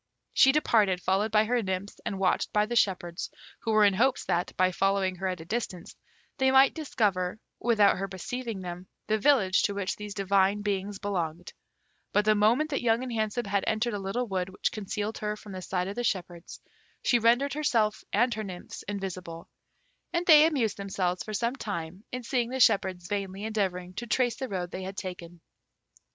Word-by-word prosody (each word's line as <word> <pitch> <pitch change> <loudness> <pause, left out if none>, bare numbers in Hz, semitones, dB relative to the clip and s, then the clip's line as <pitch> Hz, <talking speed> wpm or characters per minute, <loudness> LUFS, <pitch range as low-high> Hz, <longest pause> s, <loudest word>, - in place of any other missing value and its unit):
She 265 - +6
departed, 215 -10 +3
followed 195 +4 0
by 215 0 +4
her 240 +2 +1
nymphs 190 0 -4
and 195 - -2
watched 190 -1 +1
by 210 0 +3
the 240 +2 -4
shepherds, 180 -5 0 0.3
who 225 - -2
were 215 -1 +5
in 200 - +4
hopes 250 +8 +1
that, 175 +1 0
by 185 0 +3
following 195 0 +1
her 190 +1 -2
at 180 -3 -3
a - - -10
distance, 205 -3 -4 0.4
they 265 0 +4
might 265 +1 +6
discover, 210 - -1 0.2
without 220 -4 +4
her 195 - -2
perceiving 220 +3 -5
them, 180 0 -7 0.2
the 215 0 +1
village 210 -7 +4
to 200 - 0
which 200 -2 -2
these 210 -1 -7
divine 195 +1 +2
beings 200 0 -2
belonged; 175 -4 -3 0.6
but 205 0 +3
the 215 - +5
moment 235 +9 +2
that 275 - -1
Young 235 0 +2
and 250 -2 -5
Handsome 220 +2 -1
had 200 -1 0
entered 220 +2 0
a 205 - -2
little 195 +6 -2
wood 185 -2 -2
which 190 - -2
concealed 210 +1 -4
her 210 0 -2
from 210 - -11
the 185 -1 -6
sight 180 0 -2
of 200 - -5
the 245 - -2
shepherds, 175 -6 -3 0.4
she 240 - +3
rendered 240 +5 +3
herself 230 -8 +1
and 240 +4 +2
her 215 0 -4
nymphs 185 -3 -8
invisible, 185 -4 -5 0.6
and 340 +1 -1
they 310 -2 +8
amused 260 -9 0
themselves 190 -2 -2
for 215 - -5
some 235 +4 0
time 185 -5 -5
in 250 0 -4
seeing 240 -1 0
the 260 +1 -3
shepherds 190 -6 +3
vainly 195 0 -3
endeavouring 190 -5 -2
to 240 +5 -6
trace 245 -1 +1
the 265 -2 -4
road 180 -2 -3
they 185 - -5
had 190 +1 -6
taken. 175 -2 -7
205 Hz, 195 wpm, -28 LUFS, 185-230 Hz, 0.6 s, they